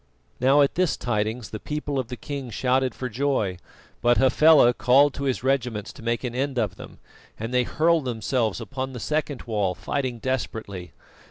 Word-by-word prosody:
Now, 135 +3 +5
at 140 - +1
this 180 -1 +1
tidings 110 0 -2
the 110 - -5
people 145 0 -3
of 130 - -3
the 125 0 -6
king 140 -3 -6
shouted 130 +3 0
for 130 - -4
joy; 125 -6 -1 0.4
but 120 0 +4
Hafela 135 -1 +6
called 130 +5 +4
to 140 - -4
his 130 -2 -1
regiments 125 -6 -1
to - - -13
make 115 +2 -1
an 125 -2 -3
end 135 +1 -2
of 105 -5 0
them, - - -11 0.4
and 115 +3 -4
they 125 - +4
hurled 165 -2 +2
themselves 115 -2 -1
upon 130 +3 -5
the 125 - -6
second 150 +2 -2
wall, 105 -6 -1
fighting 130 +1 -3
desperately. 110 -7 -4
125 Hz, 180 wpm, -25 LUFS, 115-140 Hz, 0.4 s, Hafela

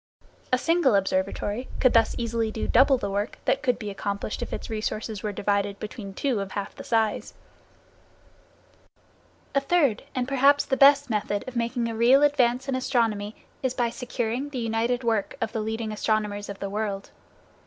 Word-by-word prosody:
A 255 - +4
single 325 -5 +3
observatory 200 +4 -1
could 255 - +4
thus 230 -1 +4
easily 230 -1 -1
do 220 - -3
double 265 +2 +5
the 200 -4 -3
work 205 +2 -2
that - - +2
could 250 - +1
be 210 -4 -5
accomplished 200 +1 -4
if - - -4
its - - -5
resources 215 -1 -3
were 210 - -2
divided 200 0 -1
between 210 -2 -7
two 260 -3 0
of 195 -1 -5
half 200 -1 -4
the - - -9
size. 220 -2 0 2.2
A 275 - +3
third, 280 -6 +2
and 255 -1 -1
perhaps 275 +1 +4
the 265 - 0
best, 280 -1 +6
method 205 0 -1
of 255 - -7
making 235 0 -1
a 230 - -3
real 250 +5 +5
advance 265 -3 +2
in 270 - -1
astronomy 225 -5 0 0.3
is 260 -1 -1
by 240 -2 0
securing 245 +2 -3
the 280 - -6
united 235 +2 0
work 225 -4 0
of 225 -3 -2
the 225 -1 -2
leading 220 0 -3
astronomers 210 -1 -1
of 200 - -6
the 200 - -4
world. 205 -2 -3
230 Hz, 175 wpm, -26 LUFS, 210-255 Hz, 2.2 s, best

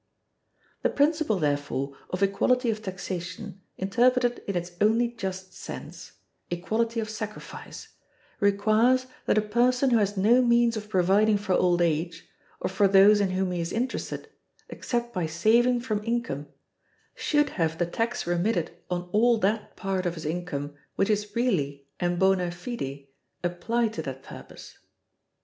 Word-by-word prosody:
The - - +2
principle, 295 -6 +2
therefore, 145 -3 -1
of 185 +2 -1
equality 240 +5 +2
of 215 0 -5
taxation, 190 0 -6 0.2
interpreted 245 +5 +2
in 200 - -2
its 175 0 -3
only 225 +3 +3
just 190 -5 -6
sense, - - -9 0.4
equality 220 +7 -1
of 220 - -2
sacrifice, 215 -1 -8 0.5
requires 215 +6 +3 0.2
that - - +3
a 215 - +3
person 250 +5 +2
who 235 - +5
has 205 -1 0
no 225 +6 +5
means 235 -1 +3
of 210 -1 -6
providing 205 +3 +3
for 200 -2 -1
old 175 -1 +3
age, 165 +1 -1 0.3
or - - -1
for 195 +2 +3
those 200 +2 +6
in 200 - +1
whom 185 0 -1
he 175 -1 -2
is 170 - -3
interested, 250 +3 -3 0.4
except 240 -1 -3
by 180 -5 -1
saving 235 +9 +3
from 215 -4 -2
income, 230 - -2 0.7
should 295 -1 +1
have 165 -2 -1
the 175 - +1
tax 230 +7 -2
remitted 175 +1 0 0.2
on 175 -1 -1
all 235 +2 +4
that 215 +1 -1
part 190 -1 -2
of 175 - -2
his 160 -1 -8
income 155 -3 -3 0.2
which 195 +2 +2
is 210 0 -2
really 145 - 0
and 175 0 0
bona 190 -1 +3
fide 170 - -6 0.4
applied 220 +6 0
to 160 - -3
that 135 -3 -7
purpose. - - -12
200 Hz, 150 wpm, -27 LUFS, 175-230 Hz, 0.7 s, those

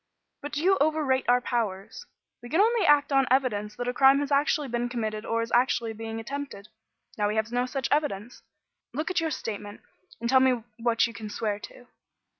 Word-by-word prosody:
But 290 0 -5
you 375 +5 +3
overrate 290 -4 +1
our 245 0 +4
powers. 230 - -3 0.3
We 240 - -10
can 325 - +1
only 440 -3 +3
act 295 -1 +4
on 270 -1 +3
evidence 215 -5 +1
that 245 0 -4
a 245 - 0
crime 270 +2 +6
has 290 0 -3
actually 285 +1 +2
been 240 0 -2
committed 220 -3 -3
or 230 0 0
is 230 - -7
actually 240 -2 +2
being 225 0 -6
attempted. 225 -4 -7 0.5
Now 205 - +2
we 210 - -1
have 220 +1 -1
no 245 +1 0
such 265 +1 -2
evidence. 245 -7 -1 0.5
Look 310 +6 -2
at 365 - +1
your 325 - 0
statement, 205 -7 -6 0.4
and 235 - -2
tell 260 +2 +5
me 255 -3 +2 0.2
what 230 -1 +2
you 230 - -5
can 215 0 -7
swear 210 -1 -2
to." 245 +3 -12
245 Hz, 200 wpm, -27 LUFS, 225-280 Hz, 0.5 s, crime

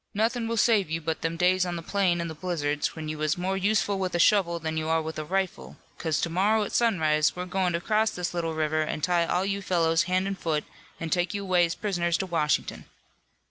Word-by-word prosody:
Nothin' 225 +2 0
will 230 0 -2
save 210 -5 +3
you 160 +1 -1
but 160 0 -3
them 165 0 -2
days 180 +1 +3
on 175 -1 -3
the 165 - -6
plain 185 -2 +1
in 170 - -3
the 160 - -6
blizzards 150 -3 -2
when 160 -1 -6
you 155 0 -5
was 155 +1 0
more 185 +2 -1
useful 200 0 +1
with 185 -2 -2
a - - +1
shovel 170 -2 +4
than 160 -1 -4
you 160 0 -2
are 165 0 +3
with 160 0 -5
a - - -3
rifle, 190 +3 -3 0.2
'cause 160 -3 0
to 170 - -1
morrow 210 +5 +2
at 205 - -5
sunrise 155 -10 +2
we're 180 0 -4
goin' 185 -1 0
to 170 - 0
cross 215 +3 +2
this 180 -2 -4
little 165 -2 -2
river 155 0 0
and 155 -1 -3
tie 175 -1 +2
all 180 +3 0
you 200 0 -2
fellows 165 -3 +2
hand 185 +1 +1
an' 195 - -1
foot 160 -5 -2 0.4
an' 165 -1 -4
take 180 +3 0
you 200 - -3
away 180 -2 +3
as 165 - -4
prisoners 175 -5 0
to 190 - -2
Washington.' 160 -4 -1
175 Hz, 245 wpm, -27 LUFS, 160-195 Hz, 0.4 s, shovel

